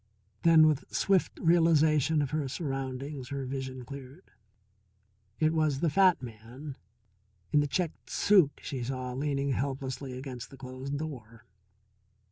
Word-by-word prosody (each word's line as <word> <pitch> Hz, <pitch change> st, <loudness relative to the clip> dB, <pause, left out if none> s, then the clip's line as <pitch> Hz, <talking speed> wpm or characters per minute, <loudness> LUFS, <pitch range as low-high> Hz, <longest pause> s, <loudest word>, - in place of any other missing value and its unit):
Then 165 Hz, -2 st, +7 dB
with 155 Hz, -2 st, +1 dB
swift 195 Hz, -2 st, +1 dB
realization 160 Hz, -3 st, +4 dB
of 140 Hz, -, -4 dB
her 155 Hz, -3 st, -1 dB
surroundings, 135 Hz, -2 st, -4 dB
her 140 Hz, -1 st, -3 dB
vision 130 Hz, -1 st, -5 dB
cleared. 140 Hz, +5 st, -11 dB, 1.1 s
It 155 Hz, 0 st, +3 dB
was 155 Hz, -4 st, +1 dB
the 165 Hz, -1 st, +1 dB
fat 185 Hz, -3 st, +4 dB
man 120 Hz, +5 st, -9 dB, 0.8 s
in 150 Hz, -, +5 dB
the 145 Hz, -, +2 dB
checked 170 Hz, +2 st, -3 dB
suit 185 Hz, -9 st, +3 dB
she 130 Hz, -3 st, -4 dB
saw 130 Hz, 0 st, -4 dB
leaning 140 Hz, +1 st, -1 dB
helplessly 135 Hz, -1 st, -3 dB
against 130 Hz, -2 st, -7 dB
the 135 Hz, -, -13 dB
closed 130 Hz, +2 st, -5 dB
door. 120 Hz, -7 st, -7 dB
140 Hz, 130 wpm, -30 LUFS, 130-155 Hz, 1.1 s, Then